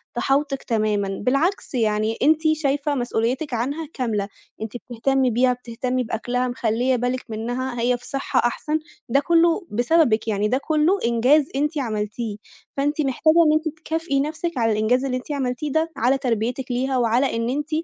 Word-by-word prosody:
تحاوطِك 275 0 0
تمامًا، 215 -4 0 0.2
بالعكس 285 +5 0
يعني 220 -1 +1
أنتِ 310 +2 +4
شايفة 285 -1 0
مسؤوليتِك 245 +3 -1
عنها 285 +7 -2
كاملة، 220 -6 -1 0.3
أنتِ 220 -2 -4
بتهتمي 255 +2 0
بيها، 250 +2 +3
بتهتمي 250 +1 -3
بأكلها، 245 +3 -2
مخليّة 245 +1 0
بالِك 250 +1 -2
منها، 245 +3 -3
هي 245 +1 +2
في 245 - -16
صحة 275 -1 -1
أحسن، 305 +6 0 0.3
ده 275 - +4
كلّه 335 +4 +2
بسببِك، 240 -1 +2
يعني 210 -1 +1
ده 255 +4 +1
كله 310 +6 +1
إنجاز 250 +6 +4
أنتِ 300 +3 0
عملتيه، 215 -3 -3 0.4
فأنتِ 290 +2 0
محتاجة 295 +3 +2
إن 305 - +4
أنتِ 315 0 -1
تكافئي 320 -3 -1
نفْسِك 315 +2 -2
على 225 -1 +2
الإنجاز 230 +5 +1
اللي 255 -1 -1
أنتِ 255 +4 -8
عملتيه 270 +1 -2
ده، 320 +2 0
على 255 +4 +3
تربيتِك 245 +1 -2
ليها 260 +1 0
وعلى 245 +2 +2
إن 230 +1 -1
أنتِ 295 +3 -2
255 Hz, 160 wpm, -22 LUFS, 230-290 Hz, 0.4 s, أنتِ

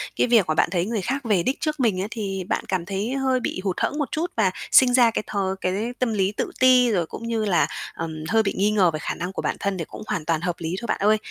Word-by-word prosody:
cái - - +2
việc 230 -6 +4
mà 155 - +1
bạn - - +2
thấy 175 -2 0
người 220 -1 -2
khác 270 +6 -2
về 200 -6 +2
đích 260 - -1
trước 305 -2 -2
mình 210 -7 +1
ấy 200 - -2
thì 195 -5 -3
bạn - - -1
cảm 185 -3 -1
thấy 200 +6 -3
hơi 265 -1 +1
bị 185 - -3
hụt 190 -3 -1
hẫng 295 - -1
một 290 - -2
chút 335 +3 -2
và 195 -4 +3 0.2
sinh 250 -2 +6
ra 245 -2 +5
cái 215 - -2
th - - -7 0.3
cái 200 +6 -1
tâm 245 -3 0
lý 195 -1 +1
tự - - -3
ti, 255 -1 +6
rồi 175 -5 +1
cũng 230 +7 -8
như 225 -2 -1
là, 190 -4 +2 0.3
ờm, 160 -1 -5
hơi 225 0 +3
bị 195 - -1
nghi 205 +2 +2
ngờ 190 -5 +3
về 155 - -4
khả - - -3
năng 180 +2 -4
của - - -3
bản - - -1
thân 200 -1 -1
đề 165 - -4
cũng - - -10
hoàn 160 - -2
toàn 165 -1 0
hợp 175 0 -1
lý 165 +1 -3
thôi - - -6
bạn - - 0
ơi. 215 +1 +4
205 Hz, 295 wpm, -23 LUFS, 185-240 Hz, 0.3 s, sinh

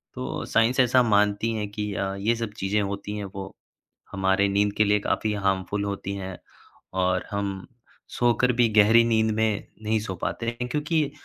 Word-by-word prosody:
तो 65 - -4
साइंस 115 +3 +2
ऐसा 125 0 +5
मानती 105 0 +2
है 105 -2 -2
कि 105 0 -4
अ, 95 +2 -2
ये 105 +4 0
सब 115 -2 -4
चीज़ें 100 +2 0
होती 100 +1 -4
हैं 105 - -4
वो 95 0 -7 0.6
हमारे 95 0 +2
नींद 100 +1 +1
के 105 - +5
लिए 105 0 +3
काफ़ी 105 +1 -1
हार्मफुल 95 0 -1
होती 100 -1 -4
हैं 95 -2 -6 0.7
और 90 0 0
हम 100 -2 -3 0.4
सोकर 120 +1 +2
भी 120 -1 +3
गहरी 110 +2 +6
नींद 110 -1 +2
में 110 -2 0 0.2
नहीं 110 0 +1
सो 95 -3 -5
पाते 115 - -4
हैं 120 +1 -3
क्योंकि, 150 0 0
105 Hz, 175 wpm, -25 LUFS, 100-115 Hz, 0.7 s, गहरी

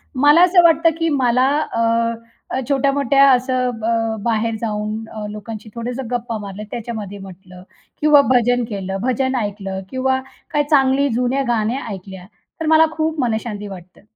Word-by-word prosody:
मला 290 +5 +5
असं 360 0 +5
वाटतं 330 0 +5
की 330 -1 0
मला 255 -2 +2
अ, 230 -1 -2
छोट्या-मोठ्या 275 0 +3
असं 255 0 +1 0.2
अ, 225 -1 0
बाहेर 230 -1 0
जाऊन 215 0 -3
अ, 215 -1 -6
लोकांशी 215 +1 -8
थोडंसं 245 +1 -5
गप्पा 235 -2 -2
मारल्या 205 0 -7
त्याच्यामध्ये 215 -4 -6
म्हटलं 185 -1 -12 0.4
किंवा 300 -1 +6
भजन 245 -1 +3
केलं, 195 -2 -4
भजन 260 +1 0
ऐकलं 195 -2 -4
किंवा 260 0 0 0.3
काही 295 - +2
चांगली 275 -1 +3
जुन्या 250 +3 0
गाण्या 235 +3 0
ऐकल्या 190 -1 -9 0.4
तर - - -1
मला 320 0 +6
खूप 315 0 -1
मनःशांती 220 -3 -2
वाटतं. 185 -2 -12
235 Hz, 145 wpm, -19 LUFS, 210-270 Hz, 0.4 s, किंवा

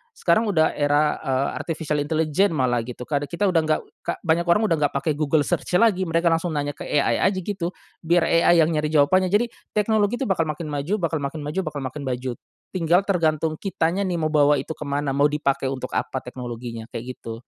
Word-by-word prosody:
sekarang 220 +6 +2
udah 160 -6 +3
era 145 +1 +1
eee, 135 -2 0
artificial 155 -2 -2
intelligence 160 +5 +1
malah 125 -3 +1
gitu, 125 0 -7
karena 145 +1 -2
kita 170 +6 -3
udah 170 - +3
enggak 155 0 +2 0.4
banyak 170 0 +1
orang 175 +6 +4
udah 165 - +3
enggak 145 -1 +1
pake 145 +3 0
Google 150 0 +2
Search - - -2
lagi 190 -3 +3
mereka 165 +1 +2
langsung 165 0 0
nanya 145 0 -1
ke - - -9
AI 145 - +1
aja 190 -1 0
gitu, 185 -2 -3 0.2
biar 170 +1 +2
AI 170 0 +5
yang 160 - +1
nyari 155 -1 0
jawabannya 155 +5 +3
jadi 215 +5 +1 0.2
teknologi 210 +1 +2
itu 270 - -3
bakal 165 -4 +1
makin 150 0 -4
maju, 145 +7 -1
bakal 165 -2 0
makin 145 +2 -4
maju, 150 +6 -3
bakal 150 -2 -4
makin 140 +3 -5
maju, 125 0 -2 0.4
tinggal 175 +1 +2
tergantung 160 -5 0
kitanya 190 0 -1
nih 180 - -1
mau 155 0 0
bawa 150 -1 +4
itu 140 +2 -4
kemana? 140 -1 -2
Mau 140 +2 +3
dipakai 140 -2 -1
untuk 130 -1 -5
apa 130 - -2
teknologinya, 120 -2 -7
kayak 125 +2 -6
gitu. 115 +1 -8
155 Hz, 200 wpm, -23 LUFS, 140-175 Hz, 0.4 s, AI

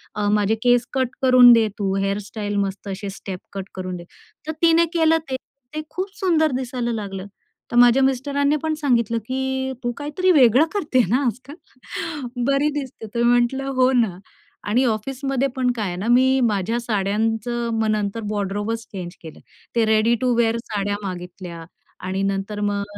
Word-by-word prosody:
अ 210 0 -1
माझे 210 +1 +2
केस 245 -1 +4
कट 260 -2 +1
करून 255 -2 +8
दे 225 -1 +4
तू 195 -2 0
हेअरस्टाइल 205 +1 -2
मस्त 195 0 -2
असे 195 +1 -5
स्टेप 190 -1 -7
कट 195 -1 -6
करून 185 -1 -4
दे. 175 - -9 0.4
तर - - -1
तिने 335 0 +5
केलं 325 -1 +4
ते. 260 - -1 0.4
ते 310 - -2
खूप 385 +2 -5
सुंदर 325 -6 +2
दिसायला 250 -2 -2
लागलं. 195 -4 -5 0.5
तर - - -3
माझ्या 245 +2 +6
मिस्टरांनी 280 +2 +1
पण 315 0 0
सांगितलं 235 -6 +1
की 265 +1 -2
"तू 240 - 0
काहीतरी 300 +6 +1
वेगळं 265 -2 +6
करते 295 - +2
ना 260 +6 +2
आजकाल, 255 +4 -4 0.9
बरी 275 +2 +2
दिसते." 260 -5 -8
तर 235 - +1
मी 240 - +4
म्हंटलं 245 +3 +2
हो 255 0 +4
ना 225 -8 +1 0.5
आणि 240 +5 +3
ऑफिसमध्ये 270 +4 -1
पण 255 -1 +1
काय 215 -4 -2
आहे 175 - -4
ना 195 +5 -4
मी 260 +2 +4
माझ्या 220 +1 0
साड्यांचं 225 +2 -1
मग 220 0 0
नंतर 210 +1 -1
वॉर्डरोबच 205 +2 -2
चेंज 180 -3 -5
केलं. 160 -2 -11 0.4
ते 230 -1 +3
रेडी 220 +2 +3
टू 250 -1 +2
विअर 230 -1 +2
साड्या 205 -1 -2
मागितल्या 180 -2 -7 0.4
आणि 190 +1 -1
नंतर 195 +1 -2
मग 205 -1 0
235 Hz, 170 wpm, -22 LUFS, 205-265 Hz, 0.9 s, करून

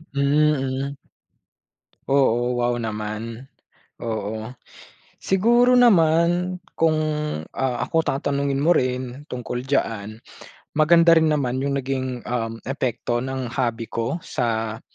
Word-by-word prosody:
Mm. 140 -1 +1 1.2
Oo, 125 -3 +2
wow 120 0 +1
naman. 110 +2 -5 0.5
Oo. 110 -1 -4 0.7
Siguro 240 +6 +4
naman 175 -4 +4 0.2
kung, 160 -1 +2 0.6
ah, 130 -2 -1
ako 165 - +1
tatanungin 140 -1 -1
mo 155 +5 +4
rin 130 -2 -1
tungkol 125 0 -4
diyaan, 115 -6 -2 0.6
maganda 165 +2 +5
rin 160 -1 +5
naman 130 -4 0
yung 140 0 -1
naging, 130 -2 -3
um, 115 -2 -3
epekto 120 -2 -2
ng 130 -2 -4
hobby 120 -3 -1
ko 115 +5 -3
sa 110 -2 -2
130 Hz, 105 wpm, -23 LUFS, 120-150 Hz, 1.2 s, maganda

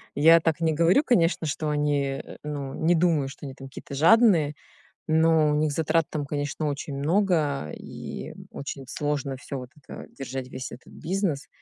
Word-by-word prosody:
Я 165 +3 +7
так 165 0 0
не 160 -1 +2
говорю, 170 - +4
конечно, 170 - +2
что 150 +1 -2
они, 145 -2 0
э, - - -11
ну, 140 -3 -5
не 170 +2 +2
думаю, 160 -5 +2
что 145 - -10
они 135 - -6
там 135 0 -10
какие-то 135 +1 -10
жадные, 165 - +5 0.5
но 160 -1 +4
у - - +1
них 150 0 +1
затрат 160 +1 +1
там, 150 -2 -3
конечно, 145 +1 -3
очень 140 0 -4
много 155 - +1
и - - -8 0.2
очень 140 -1 -6
сложно 145 -4 -2
всё 140 +1 -6
вот 125 -1 -8
это 140 - -10
держать, 135 -1 -6
весь 130 -1 -6
этот 125 - -12
бизнес. 175 -4 -2
150 Hz, 175 wpm, -26 LUFS, 140-165 Hz, 0.5 s, Я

